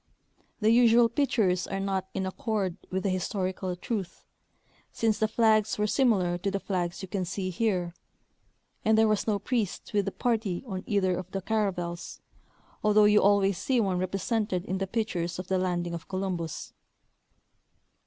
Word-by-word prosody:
The 215 +1 +4
usual 235 0 +6
pictures 215 -8 +1
are 195 - -3
not 195 -1 -1
in 190 - -1
accord 190 -1 -2
with 190 0 -2
the 195 - +1
historical 185 0 -2
truth, 195 0 -5
■ - - -43 0.2
since 225 -2 0
the 220 - +3
flags 220 -1 +3
were 210 - +1
similar 205 -8 +2
to 200 - -1
the 195 0 -2
flags 180 -2 -3
you - - -5
can 190 0 -2
see 185 +1 -3
here, 180 -4 0 0.9
and 220 0 +4
there 220 0 +5
was 215 0 +1
no 210 -2 +2
priest, 210 -1 -2
with 205 -2 +2
the 195 - -2
party 220 -6 -1
on 190 -5 -5
either 190 -3 +2
of 185 0 -6
the 195 0 -4
caravels, 180 -6 -2 0.6
although 210 0 +5
you 210 0 +5
always 200 -2 +3
see 255 +5 +1
one 190 -5 +1
represented 195 +1 -1
in 190 -1 -2
the 195 - -2
pictures 185 -6 -2
of 185 0 -7
the 190 -1 +2
landing 175 -2 -1
of 170 -1 -6
Columbus. 185 -4 -4
195 Hz, 170 wpm, -28 LUFS, 185-215 Hz, 0.9 s, usual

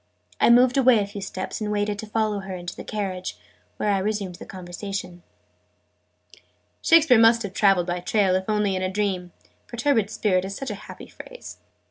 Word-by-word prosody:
I - - +4
moved 250 +2 +5
away 255 -3 +6
a 205 - +1
few 200 0 -8
steps, 190 +2 -5
and 210 -1 -2
waited 205 0 -1
to 220 - -6
follow 215 -1 0
her 190 -1 -6
into 175 -1 -7
the - - -8
carriage, 190 -4 -4 0.4
where 210 - 0
I 195 - +2
resumed 200 -2 -2
the - - -11
conversation. 180 0 -7 1.6
"Shakespeare 325 -8 +6
must 230 0 +5
have 200 -2 -6
traveled 195 -3 +3
by 175 0 -3
rail, 200 -4 +3
if 190 +2 -2
only 210 -2 +1
in 185 - -2
a 185 - -1
dream: 190 -3 -2 0.4
'perturbed 240 -4 +1
Spirit' 190 -4 +1
is 195 +1 -5
such 270 - -5
a - - -8
happy - - -9
phrase." - - -12
205 Hz, 185 wpm, -24 LUFS, 185-220 Hz, 1.6 s, away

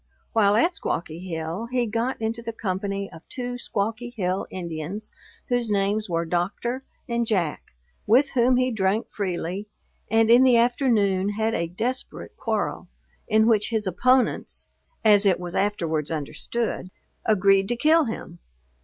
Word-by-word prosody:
While 205 -3 +4
at 335 +11 +3
Squawky 165 - -3
Hill 170 +4 -4
he 250 0 0
got 230 +4 -2
into 225 +1 -2
the 230 0 -4
company 195 -1 -3
of 160 - -12
two 245 -1 -4
Squawky 225 +2 -3
Hill 185 -1 -1
Indians, 175 +4 -5 0.4
whose 245 -2 +1
names 205 +1 0
were 170 0 0
Doctor 200 +10 -2 0.2
and 235 -1 -1
Jack, 180 -9 0 0.5
with 260 +6 +4
whom 250 0 +3
he 255 0 +2
drank 205 0 0
freely, 185 0 -3 0.4
and 225 0 +4
in 240 +2 +8
the 250 -2 +6
afternoon 225 -6 +2
had 220 +1 0
a 170 - -1
desperate 235 +9 -4
quarrel, - - -2 0.4
in 220 0 +4
which 215 -3 +3
his 220 -2 -1
opponents, 250 +8 +1 0.4
(as 205 -2 +6
it 190 -4 +3
was 175 -1 -6
afterwards 165 -7 0
understood,) 180 +7 -3 0.3
agreed 195 -2 +4
to 240 - 0
kill 315 +5 +4
him. 180 -6 -6
210 Hz, 145 wpm, -25 LUFS, 185-235 Hz, 0.5 s, in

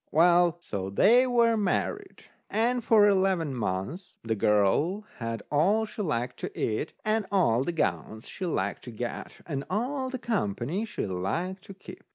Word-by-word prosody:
Well, 175 +1 +4
so 95 - -5
they 240 - +5
were 235 -2 +3
married. 370 - -2 0.3
And 235 +3 +1
for 215 -2 +5
eleven 190 -6 +2
months 115 - -4
the 115 -1 -1
girl 105 - +2 0.2
had 115 -2 -4
all 195 +10 +3
she 215 - -7
liked 125 - -2
to - - -6
eat, 110 +8 -1
and 215 -1 +1
all 130 - +3
the 175 - -2
gowns 110 -8 -2
she 185 - -5
liked 100 - -2
to 120 - -7
get, 120 +2 -6
and 140 -4 -3
all 260 +6 -1
the 260 - -4
company 185 - -2
she 215 - -4
liked 160 - -3
to 195 - -10
keep. 195 - -12
175 Hz, 165 wpm, -28 LUFS, -, 0.3 s, they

